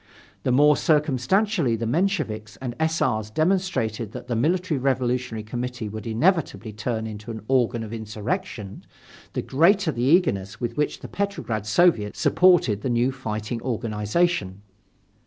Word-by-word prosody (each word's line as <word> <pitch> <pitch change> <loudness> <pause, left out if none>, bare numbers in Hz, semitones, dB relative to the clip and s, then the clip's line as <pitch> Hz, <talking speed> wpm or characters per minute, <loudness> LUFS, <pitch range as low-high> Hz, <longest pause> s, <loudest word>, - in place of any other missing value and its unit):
The - - 0
more 145 +3 +5
circumstantially 155 - +2
the 115 +1 -3
Mensheviks 120 - -1
and 120 +1 -6
S. 160 +1 +1
R.'s 110 -1 0
demonstrated 155 - 0
that - - -7
the 120 - -1
Military 165 +4 +1
Revolutionary 125 -3 -1
Committee 120 0 -4
would 110 +1 -7
inevitably 130 - 0
turn 110 +1 -3
into 105 0 -7
an 110 -3 -6
organ 120 -3 +1
of 110 0 -7
insurrection, 110 - -4 0.5
the - - -2
greater 170 +5 +3
the 120 - -4
eagerness 125 - +2
with 120 -1 -3
which 150 - -1
the - - -7
Petrograd 160 - -3
Soviet 110 - +3
supported 170 - +4
the 130 - -2
new 120 +2 +2
fighting 115 -2 -4
organization. 105 - -1
120 Hz, 140 wpm, -24 LUFS, 110-160 Hz, 0.5 s, more